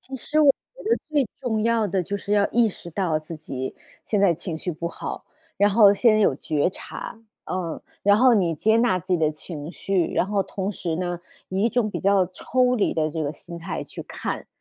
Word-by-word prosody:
其 270 - -10
实 305 +4 0
我 290 - +7 0.2
觉 - - -12
得 455 +2 +2
最 295 -3 +2 0.2
重 220 -4 -1
要 230 -1 +2
的 190 -1 0
就 200 +4 -3
是 200 0 -4
要 205 -1 +3
意 235 0 +4
识 175 -4 -6
到 165 -3 0
自 155 +1 -8
己 130 -3 -5 0.3
现 210 - 0
在 190 -4 +4
情 165 0 -5
绪 180 - -3
不 170 +2 -4
好， - - -6 0.3
然 205 +1 +4
后 205 -1 +7
先 215 0 +4
有 195 - +4
觉 150 +3 0
察。 215 - -8 0.4
嗯， 175 -3 -3 0.2
然 205 0 +6
后 250 +3 +6
你 175 -5 +2
接 220 +8 +3
纳 230 -5 +3
自 185 +2 -4
己 - - +5
的 155 -1 +3
情 155 0 -8
绪， 185 -4 0
然 - - +3
后 200 +1 0
同 195 +1 -3
时 175 -4 -3
呢， 175 0 -2 0.3
以 190 +2 -1
一 230 - +4
种 230 -3 0
比 - - -3
较 195 -1 +3
抽 250 +7 +1
离 210 - +1
的 155 -1 0
这 160 0 -3
个 145 - -2
心 170 +2 -10
态 165 - -4
去 - - -8
看。 - - -5
195 Hz, 240 characters per minute, -24 LUFS, 170-220 Hz, 0.4 s, 我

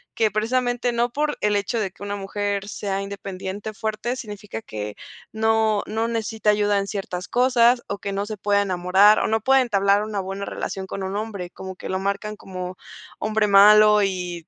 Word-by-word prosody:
que 220 -2 +2
precisamente 245 +3 0
no 235 0 0
por 295 +2 -1
el 210 0 +2
hecho 205 +3 -1
de 195 -3 -2
que - - -24
una 205 0 -3
mujer 200 0 -3
sea 195 -1 -3
independiente, 195 +1 -6
fuerte, 220 +4 -3
significa 210 - -7
que 105 -1 -6 0.4
no, 220 -1 +2
no 225 +1 -1
necesita 220 -2 -1
ayuda 205 -1 +2
en 195 - -3
ciertas 190 -3 -5
cosas 245 -1 +3
o 200 - -4
que 200 - -4
no 200 +1 -2
se 215 0 -6
pueda 205 +1 +2
enamorar 190 +3 +4
o - - 0
no 220 +1 +1
pueda 265 +3 +4
entablar 200 -4 +2
una 210 -1 -3
buena 195 +1 -4
relación 190 -1 -5
con 195 - -5
un 190 +1 -4
hombre, 205 -4 -5
como 190 0 -8
que - - -8
lo 190 0 -1
marcan 200 +2 -3
como 185 -1 -7 0.4
hombre 215 0 +1
malo 210 +1 +7
y 180 -4 -3
205 Hz, 190 wpm, -23 LUFS, 195-220 Hz, 0.4 s, malo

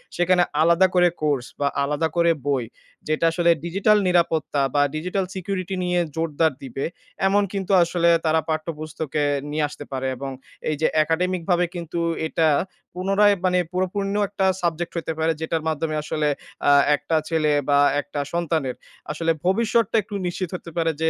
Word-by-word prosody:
সেখানে 180 0 +3 0.2
আলাদা 170 +3 +5
করে 180 0 +6
কোর্স 145 -5 0
বা 140 - +1 0.2
আলাদা 150 +3 0
করে 170 0 +4 0.2
বই, 135 -3 +1 0.4
যেটা 155 +2 +1
আসলে 170 +1 +1 0.2
ডিজিটাল 195 +5 +3
নিরাপত্তা 165 -5 +1
বা 145 - +4
ডিজিটাল 180 +4 -1
সিকিউরিটি 190 0 -3
নিয়ে 180 0 +1 0.2
জোরদার 160 -1 +1
দিবে। 135 +1 -4 0.4
এমন 205 +1 +3
কিন্তু 195 -1 -3
আসলে 170 0 +1 0.2
তারা 160 0 +3
পাঠ্যপুস্তকে 155 -1 -3 0.3
নিয়ে 155 +1 0
আসতে 145 - -9
পারে, 130 0 -2
এবং 135 +1 -5 0.4
এই 155 - 0
যে - - +4 0.2
একাডেমিকভাবে 175 +2 0
কিন্তু 170 0 -4 0.3
এটা 160 0 +1 0.5
পুনরায় 195 +3 +3
মানে 180 0 +3
পরিপূর্ণ 185 +2 -1
একটা 195 -1 -1 0.2
সাবজেক্ট 170 0 -2
হইতে 165 -1 -2
পারে, 160 +1 +2
যেটার 160 0 -2
মাধ্যমে 155 0 -2
আসলে 150 0 -1 0.4
আ - - +7 0.2
একটা 160 - -2
ছেলে 155 -2 +2 0.2
বা 140 0 +5 0.2
একটা 145 - -6
সন্তানের 160 -6 -1 0.4
আসলে 165 +2 0
ভবিষ্যৎটা 225 +3 +2
একটু 205 +1 -8
নিশ্চিত 175 0 -3
হতে 175 - -8
পারে 165 -1 +2
যে 160 - +3
165 Hz, 155 wpm, -23 LUFS, 155-180 Hz, 0.5 s, আ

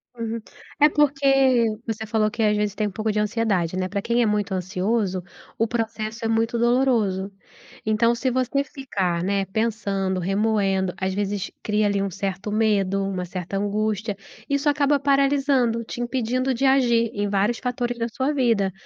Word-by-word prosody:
Uhum, 230 0 -3 0.4
é 295 - +8
porque, 270 -4 +3 0.2
você 220 0 -3
falou 215 -1 +1
que 225 0 -2
às 210 0 +3
vezes 210 -1 -1
tem 215 - 0
um - - -5
pouco 215 +1 -1
de 210 - -3
ansiedade, 210 -5 0
né, 185 0 -1
pra 200 +2 -3
quem 235 +3 +1
é 225 - +3
muito 210 -1 0
ansioso, 185 +1 -1 0.3
o 225 - +1
processo 225 -1 -3
é - - +1
muito 225 +1 +1
doloroso. 230 -6 +2 0.5
Então 220 +2 +2
se 255 +2 -1
você 255 +2 0
ficar, 190 - -2
né, 195 0 0
pensando, 195 -3 -1
remoendo, 195 -1 +1
às 190 0 -1
vezes 205 -1 -2
cria 210 0 +1
ali 200 -1 0
um 195 -1 -1
certo 195 +1 -4
medo, 200 -3 +1
uma 185 -2 -3
certa 185 +2 -5
angústia, 210 +1 -1 0.3
isso 280 +1 +1
acaba 285 0 +2
paralisando, 275 -4 +2
te 240 - -7
impedindo 255 +1 -1
de 250 - -3
agir 240 -4 +3
em 205 0 -1
vários 205 +4 +1
fatores 245 -1 -2
da 230 0 -1
sua 260 +5 -1
vida, 230 -8 +2
220 Hz, 170 wpm, -23 LUFS, 195-240 Hz, 0.5 s, é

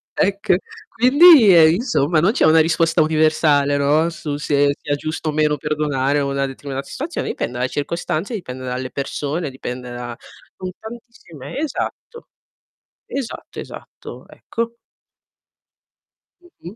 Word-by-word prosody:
Ecco, 200 -1 +1 0.4
quindi 255 - +7
eh, 160 -1 +7
insomma 170 - +1
non 180 +7 +3
c'è 255 - +2
una 160 +1 +6
risposta 165 +1 +2
universale, 155 -2 +2
no, 150 +4 +2
su 150 -3 -5
se 145 -1 +1
sia 145 - -3
giusto 155 +2 -4
o - - 0
meno 150 0 +1
perdonare 145 -2 -1
una 140 -1 -1
determinata 135 0 -6
situazione, 310 +6 -5
dipende 120 - -3
dalle 125 +1 0
circostanze, 170 - -3
dipende 130 -9 -7
dalle 125 +1 -4
persone, 145 +3 -3
dipende 125 -1 -7
da 120 -1 -6 0.4
son 185 - -6
tantissime 220 - -11
esatto. 315 - -5 0.8
Esatto, 270 -4 -6
esatto, - - -11
ecco. 230 0 -5 1.7
Mh-mh. 220 - -13
155 Hz, 125 wpm, -20 LUFS, 140-195 Hz, 1.7 s, quindi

